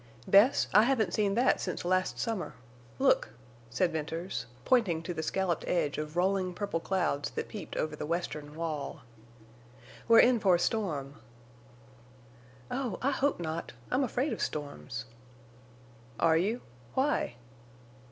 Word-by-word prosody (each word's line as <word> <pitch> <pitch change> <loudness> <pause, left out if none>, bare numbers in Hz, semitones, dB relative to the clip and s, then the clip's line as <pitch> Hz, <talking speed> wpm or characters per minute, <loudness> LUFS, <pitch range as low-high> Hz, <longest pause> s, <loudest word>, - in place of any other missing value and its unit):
"Bess, 205 +7 +5
I 210 - +8
haven't 225 -9 +1
seen 200 -2 +1
that 245 +3 +3
since 180 - -3
last 185 +1 +1
summer. 225 - -3 0.4
Look!" 110 - +2 0.3
said 170 +10 +1
Venters, 160 -4 -4 0.2
pointing 190 -11 +3
to 175 - -3
the 160 - -3
scalloped 175 +1 -1
edge 150 -5 0
of 155 +2 -5
rolling 185 0 +1
purple 200 -4 -2
clouds 165 -5 0
that - - -4
peeped 210 - -7
over 155 -1 -1
the 150 - -5
western 155 -3 -3
wall. 160 -2 -4 1.1
"We're 230 -1 +8
in 245 -1 +4
for 190 -4 +4
a - - 0
storm." 155 -10 -1 1.5
"Oh, 250 -7 -2
I 275 - +3
hope 280 -3 +1
not. 165 -4 -4 0.2
I'm 255 +2 +2
afraid 260 +3 0
of - - -5
storms." 140 -5 -4 1.1
"Are 160 -1 +4
you? 205 +9 +1 0.3
Why?" 265 - +1
180 Hz, 140 wpm, -30 LUFS, 155-220 Hz, 1.5 s, I